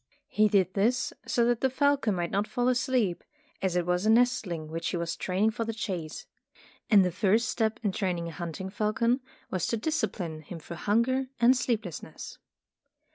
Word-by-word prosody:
He 215 0 +4
did 190 -3 +2
this 235 +6 +1
so 235 - +2
that 240 -1 +1
the 265 - +3
falcon 275 -5 +2
might 175 -1 -2
not 205 +2 0
fall 245 0 0
asleep, 250 -7 +1 0.4
as 190 -2 0
it 175 -1 +1
was 180 +1 +1
a 215 - +2
nestling 225 -9 +2
which 165 +1 -4
he 180 - -2
was 170 -1 -2
training 195 +4 +1
for 230 - -3
the 225 -1 -4
chase. 180 -8 -4 0.6
And 200 -5 +6
the 180 - 0
first 205 +6 +2
step 220 -1 0
in 205 - +1
training 180 -4 -2
a - - -5
hunting 175 +4 -5
falcon 230 +4 +1 0.3
was 185 -2 -1
to 230 - 0
discipline 210 - -2
him 165 +3 -8
through 170 +2 -8
hunger 235 +7 +1
and 240 +2 +6
sleep 240 -3 0
lessness. 175 - -8
210 Hz, 185 wpm, -28 LUFS, 180-240 Hz, 0.6 s, And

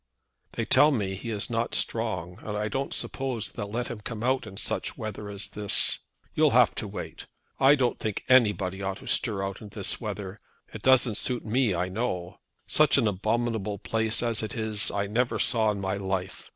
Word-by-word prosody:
"They - - -2
tell 150 - +6
me 105 -9 -1
he 100 +5 -6
is 105 -3 -2
not 115 0 -1
strong, 95 -5 -1
and 105 -1 -5
I 105 +1 -1
don't 135 +3 -2
suppose 130 -5 -3
they'll 100 - -5
let 120 +3 -2
him 115 -3 -6
come 110 +1 -6
out 130 -2 +1
such - - -3
weather 110 -1 -6
as 100 -1 -3
this. 105 -1 +2 0.3
You'll - - +4
have - - +5
to - - -5
wait. - - -7 0.3
I 135 +2 +7
don't 125 -4 0
think 110 -2 -3
any 125 -5 +6
body 95 -1 -4
ought 95 0 -2
to - - -13
stir 105 -5 0
out 95 0 -4
in 105 - -9
this 100 -1 -1
weather. 105 -2 -5 0.3
It 110 - -7
doesn't 125 -4 +4
suit 125 -2 -2
me, 115 -2 +1
I 90 +2 0
know. 95 -3 -3 0.3
Such 155 -2 +4
an 120 -5 +3
abominable 105 +1 -1
place 110 +3 0
as 115 -2 0
it 110 - -4
is 110 -2 +3
I 100 0 -1
never 120 +5 0
saw 110 -4 +2
in 105 -1 -1
my 95 0 -2
life. 95 -1 -4
110 Hz, 200 wpm, -27 LUFS, 100-120 Hz, 0.3 s, I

